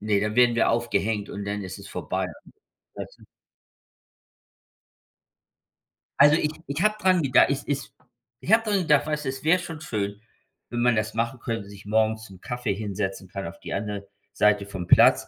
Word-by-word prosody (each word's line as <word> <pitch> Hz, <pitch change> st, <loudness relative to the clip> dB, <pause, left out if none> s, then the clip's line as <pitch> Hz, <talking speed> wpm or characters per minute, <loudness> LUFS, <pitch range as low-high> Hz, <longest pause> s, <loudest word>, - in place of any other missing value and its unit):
ne, 105 Hz, -1 st, +1 dB
dann 105 Hz, +1 st, -1 dB
werden 120 Hz, -1 st, +5 dB
wir 115 Hz, -, +3 dB
aufgehängt 110 Hz, -3 st, 0 dB
und 100 Hz, 0 st, -5 dB
dann 100 Hz, 0 st, -3 dB
ist 95 Hz, +1 st, -7 dB
es 100 Hz, -, -11 dB
vorbei.“, 90 Hz, +2 st, -3 dB, 0.7 s
weißt -, -, -8 dB
du? -, -, -16 dB, 3.0 s
Also 145 Hz, +2 st, +8 dB
ich 150 Hz, -2 st, +1 dB, 0.2 s
ich 140 Hz, +7 st, -2 dB
habe 215 Hz, 0 st, +3 dB
daran 185 Hz, -3 st, +3 dB
geda 130 Hz, -2 st, +5 dB
es 140 Hz, 0 st, -1 dB
ist 140 Hz, -1 st, -4 dB, 0.5 s
ich 190 Hz, -, -3 dB
habe 225 Hz, +1 st, +6 dB
daran 205 Hz, -3 st, +1 dB
gedacht, 150 Hz, -4 st, +3 dB
weißt 150 Hz, -1 st, -2 dB
du, 130 Hz, -, 0 dB
es 130 Hz, +1 st, -6 dB
wäre 170 Hz, +3 st, +5 dB
schon 165 Hz, -3 st, -7 dB
schön, 105 Hz, -6 st, -3 dB, 0.5 s
wenn 120 Hz, 0 st, -2 dB
man 120 Hz, -1 st, +4 dB
das 110 Hz, +1 st, -1 dB
machen 115 Hz, +3 st, -2 dB
könnte, 115 Hz, -4 st, -4 dB
sich 100 Hz, 0 st, -13 dB
morgens 110 Hz, +1 st, +1 dB
zum 95 Hz, -3 st, -14 dB
Kaffee 125 Hz, -4 st, -2 dB
hinsetzen 95 Hz, -2 st, -4 dB
kann, 100 Hz, -2 st, -5 dB
auf 85 Hz, -, -10 dB
die -, -, -6 dB
andere 100 Hz, -1 st, -4 dB, 0.3 s
Seite 105 Hz, -1 st, +3 dB
vom 95 Hz, -3 st, -6 dB
Platz -, -, +6 dB
110 Hz, 185 wpm, -25 LUFS, 100-140 Hz, 3.0 s, Also